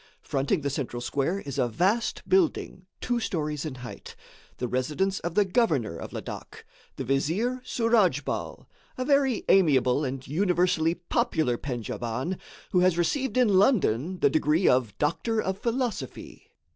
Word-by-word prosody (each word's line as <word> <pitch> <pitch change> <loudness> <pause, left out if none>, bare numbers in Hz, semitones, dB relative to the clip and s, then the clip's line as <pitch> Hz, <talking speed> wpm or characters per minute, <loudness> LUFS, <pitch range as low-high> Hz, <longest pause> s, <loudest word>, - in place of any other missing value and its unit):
Fronting 140 +6 0
the 140 0 -2
central 130 -3 -3
square 140 +10 -1
is 140 -1 -5
a 125 - +3
vast 190 - 0
building, 320 - +1
two 245 -1 0
stories 150 -8 -2
in 150 -4 -4
height, - - -9 0.4
the 125 - -2
residence 150 +11 -1
of 170 0 -4
the 205 - +4
governor 160 - +1
of - - -7
Ladak, - - -8 0.3
the - - -4
Vizier 170 - 0
Souradjbal 230 -5 0 0.3
a 255 - -2
very 275 -4 +2
amiable 140 -7 +4
and 130 -1 -4
universally 175 0 +2
popular 160 -6 0
Pendjaban, 120 - -4 0.3
who 180 - +3
has 180 -1 +3
received 255 - 0
in 210 -7 +5
London 185 - +2
the - - +5
degree 155 +3 +2
of 125 -5 +2
Doctor 220 +9 0
of 190 -2 -2
Philosophy. 240 0 -4
170 Hz, 145 wpm, -27 LUFS, 135-210 Hz, 0.4 s, in